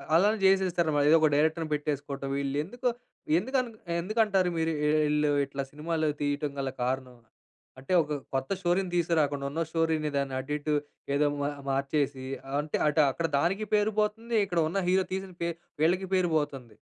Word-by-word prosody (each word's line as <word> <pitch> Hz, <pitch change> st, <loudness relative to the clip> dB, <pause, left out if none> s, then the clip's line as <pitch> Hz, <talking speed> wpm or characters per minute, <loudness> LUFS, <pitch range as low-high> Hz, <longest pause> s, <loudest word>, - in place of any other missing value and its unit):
అలానే 205 Hz, +6 st, +4 dB
చేసేస్తారన్న 180 Hz, -4 st, +3 dB
మాట. 145 Hz, -, +3 dB
ఏదో 165 Hz, -, +8 dB
ఒక 155 Hz, -, +6 dB
డైరెక్టర్‌ని 160 Hz, +1 st, +1 dB
పెట్టేసుకోవటం 145 Hz, -2 st, -3 dB
వీళ్ళు. 140 Hz, 0 st, -2 dB
ఎందుకు 245 Hz, +9 st, -4 dB, 0.5 s
ఎందుకు 260 Hz, +8 st, -1 dB
అన్ 245 Hz, -, -6 dB, 0.3 s
ఎందుకంటారు 195 Hz, -2 st, +2 dB
మీరు 160 Hz, 0 st, +1 dB, 0.3 s
వీళ్ళు 150 Hz, 0 st, +2 dB, 0.2 s
ఇట్లా 140 Hz, 0 st, -4 dB
సినిమాలు 155 Hz, +1 st, -1 dB
తీయడం 145 Hz, 0 st, -1 dB
గల 135 Hz, -1 st, -1 dB
కారణం? 130 Hz, 0 st, -2 dB, 0.6 s
అంటే 135 Hz, +7 st, -3 dB
ఒక 150 Hz, -1 st, -3 dB, 0.2 s
కొత్త 135 Hz, 0 st, -1 dB
స్టోరీని 180 Hz, 0 st, 0 dB
తీసుకురాకుండా 150 Hz, -5 st, +1 dB
ఉన్న 165 Hz, +3 st, -2 dB
స్టోరీని 160 Hz, -2 st, 0 dB
దాన్ని 135 Hz, -1 st, -1 dB
అటు 130 Hz, +2 st, -7 dB
ఇటు 150 Hz, +1 st, -2 dB, 0.4 s
ఏదో 150 Hz, +1 st, +3 dB
మూఆ 145 Hz, 0 st, 0 dB, 0.2 s
మార్చేసి 135 Hz, 0 st, -1 dB, 0.3 s
అంటే 150 Hz, 0 st, -2 dB
అటు 150 Hz, +1 st, +3 dB
అక్కడ 165 Hz, +4 st, -1 dB
దానికి 195 Hz, +7 st, 0 dB
పేరు 210 Hz, +1 st, +3 dB
పోతుంది 225 Hz, +2 st, -1 dB
ఇక్కడ 175 Hz, -3 st, -1 dB
ఉన్న 195 Hz, +3 st, -1 dB
హీరో 185 Hz, +1 st, +3 dB
తీసిన 190 Hz, 0 st, -4 dB
పే 170 Hz, -, 0 dB, 0.3 s
వీళ్ళకి 180 Hz, +4 st, +2 dB
పేరు 180 Hz, -2 st, +2 dB
పోతుంది. 135 Hz, -6 st, -4 dB
160 Hz, 165 wpm, -28 LUFS, 145-185 Hz, 0.6 s, ఏదో